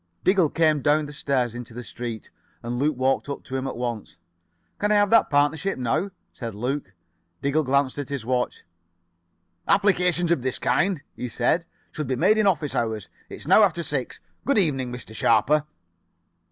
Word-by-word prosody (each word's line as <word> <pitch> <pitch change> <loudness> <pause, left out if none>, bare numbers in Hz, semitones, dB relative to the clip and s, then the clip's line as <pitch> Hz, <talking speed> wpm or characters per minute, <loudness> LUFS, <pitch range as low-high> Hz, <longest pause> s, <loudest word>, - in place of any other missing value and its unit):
Diggle 185 -4 +4
came 155 -3 +2
down 150 +3 +2
the 145 - -9
stairs 130 -5 0
into 120 -1 -8
the 125 - -6
street, 115 -2 -6 0.3
and 120 +1 -3
Luke 145 0 +1
walked 135 +2 +1
up 140 - -5
to 130 - -7
him 135 0 -2
at 130 - -5
once: 120 -3 -4 0.6
"Can 210 +1 +1
I - - +5
have 205 -1 +3
that 230 - +5
partnership 145 +6 +1
now?" 130 +10 0 0.2
said 115 -4 -6
Luke. 125 -2 -3 0.5
Diggle 145 +3 +2
glanced 140 +1 +1
at 140 - -5
his 140 -5 -4
watch. 125 0 -1 1.0
"Applications 180 -4 +3
of 170 - +2
this 130 0 -1
kind," 180 -5 +1
he 125 - -5
said, 145 +9 0 0.2
"should 150 -3 -4
be 130 - 0
made 215 - +3
in 210 - +3
office 160 -6 +1
hours. 110 -3 -2 0.2
It - - -7
is - - -11
now - - +7
after 170 -5 +2
six. 140 -5 -3 0.2
Good 280 - +1
evening, 135 -10 +1
Mr. 125 -3 -8
Sharper." 150 +7 +3
140 Hz, 180 wpm, -24 LUFS, 125-165 Hz, 1.0 s, now